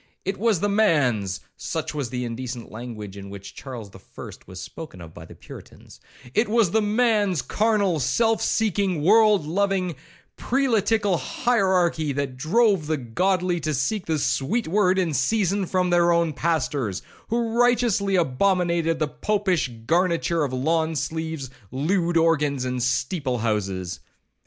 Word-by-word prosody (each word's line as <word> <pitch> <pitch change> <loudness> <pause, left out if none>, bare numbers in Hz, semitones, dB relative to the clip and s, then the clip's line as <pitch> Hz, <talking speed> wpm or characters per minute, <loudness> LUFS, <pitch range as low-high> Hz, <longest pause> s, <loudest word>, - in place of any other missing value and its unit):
It 195 0 -2
was 215 -5 +2
the 205 - +2
man's 130 - +1 0.2
(such 160 -2 -4
was 145 -5 -3
the 125 +1 -3
indecent 120 0 -6
language 110 -4 -8
in 100 0 -9
which 100 0 -9
Charles 120 -7 -8
the - - -13
First - - -12
was 95 0 -9
Spoken 95 - -9
of 80 -2 -11
by 80 - -11
the - - -13
Puritans)—it 210 - -6
was 220 -5 +3
the 220 - +3
man's 210 - +1
carnal, 205 - +1
self 225 - +1
seeking, 195 -7 0
World 210 -1 +5
loving, 185 0 0 0.4
prelatical 225 -7 +1
hierarchy, 185 - +1
that 140 -2 -3
drove 185 - +2
the 155 0 0
godly 180 +8 0
to 155 -1 -2
seek 180 - -1
the 160 -1 +1
sweet 150 - 0
word 190 +1 +2
in 175 -4 0
season 195 - +1
from 180 -1 0
their 175 0 +4
own 170 -2 +2
pastors, 140 - -1 0.2
who 230 0 -1
righteously 235 -5 +2
abominated 170 +1 +1
the 155 -1 0
Popish 190 -3 0 0.2
garniture 170 +1 +1
of 140 - -2
lawn 160 +5 0
sleeves, 160 -1 -4 0.2
lewd 170 - 0
organs, 150 -5 +2
and 125 -1 -2
steeple 130 +1 -1
houses. 95 -6 -2
165 Hz, 145 wpm, -24 LUFS, 130-200 Hz, 0.4 s, World